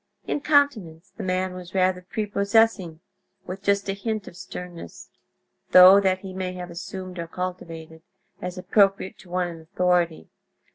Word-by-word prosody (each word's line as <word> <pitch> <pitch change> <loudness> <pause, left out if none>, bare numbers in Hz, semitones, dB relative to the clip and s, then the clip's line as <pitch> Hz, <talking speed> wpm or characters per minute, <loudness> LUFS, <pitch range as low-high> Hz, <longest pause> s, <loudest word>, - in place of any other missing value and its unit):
In 290 - -2
countenance 220 - +1
the - - -7
man 185 0 -1
was 180 0 -10
rather 185 -1 +2
prepossessing, 200 -3 +1 0.4
with 190 +1 -7
just 200 0 +1
a 195 - 0
hint 215 +1 -4
of - - -10
sternness; 180 - -9 0.6
though 185 +2 +10
that 190 -1 +1
he 190 -1 -8
may 185 -1 -4
have 180 -1 -7
assumed 185 +1 -7
or 170 - -4
cultivated, 165 -3 -6 0.4
as 180 +1 -5
appropriate 195 +1 +2
to 185 - -16
one 180 0 0
in 165 -2 -9
authority. 175 0 0
185 Hz, 150 wpm, -24 LUFS, 175-195 Hz, 0.6 s, though